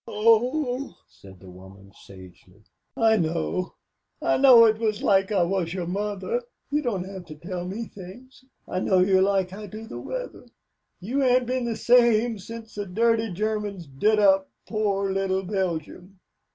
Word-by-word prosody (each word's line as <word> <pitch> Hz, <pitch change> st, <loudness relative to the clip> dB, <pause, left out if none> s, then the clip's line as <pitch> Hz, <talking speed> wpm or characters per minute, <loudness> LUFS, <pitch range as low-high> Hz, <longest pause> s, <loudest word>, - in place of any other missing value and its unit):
"Oh," 245 Hz, -, +1 dB
said 95 Hz, -1 st, -16 dB
the 95 Hz, 0 st, -13 dB
woman, 95 Hz, +2 st, -15 dB
sagely, 95 Hz, +1 st, -16 dB, 0.3 s
"I 225 Hz, -1 st, +4 dB
know. 170 Hz, +1 st, -2 dB, 0.4 s
I -, -, +1 dB
know 255 Hz, -4 st, +8 dB
it 220 Hz, -1 st, +2 dB, 0.2 s
like 195 Hz, 0 st, +2 dB
I 195 Hz, -4 st, +3 dB
wuz 175 Hz, -1 st, -1 dB
your 180 Hz, -2 st, -3 dB
mother. 205 Hz, -, -3 dB, 0.3 s
You 295 Hz, +1 st, +1 dB
don't 220 Hz, -9 st, -2 dB
have 190 Hz, -1 st, -9 dB
to 155 Hz, -, -10 dB
tell 175 Hz, +3 st, -6 dB
me 215 Hz, +5 st, -5 dB
things. 220 Hz, +8 st, -13 dB, 0.2 s
I 185 Hz, -, -2 dB
know 190 Hz, 0 st, +2 dB
you 190 Hz, +1 st, +4 dB
like 190 Hz, -1 st, +1 dB
I 210 Hz, +1 st, -8 dB
do 215 Hz, +2 st, -9 dB
the 225 Hz, -, -8 dB
weather. -, -, -7 dB, 0.5 s
You 245 Hz, +10 st, -2 dB
ain't 255 Hz, -1 st, +3 dB
been 255 Hz, 0 st, -2 dB
the 235 Hz, -1 st, -2 dB
same 235 Hz, -2 st, +3 dB
since 225 Hz, +2 st, -10 dB
the 205 Hz, -1 st, -5 dB
dirty 225 Hz, +3 st, +1 dB
Germans 205 Hz, -1 st, -3 dB
did 150 Hz, +11 st, +1 dB
up 195 Hz, -2 st, +4 dB, 0.2 s
poor 200 Hz, -3 st, -1 dB
little 190 Hz, 0 st, -1 dB
Belgium. 185 Hz, -1 st, -4 dB
200 Hz, 160 wpm, -25 LUFS, 180-230 Hz, 0.5 s, know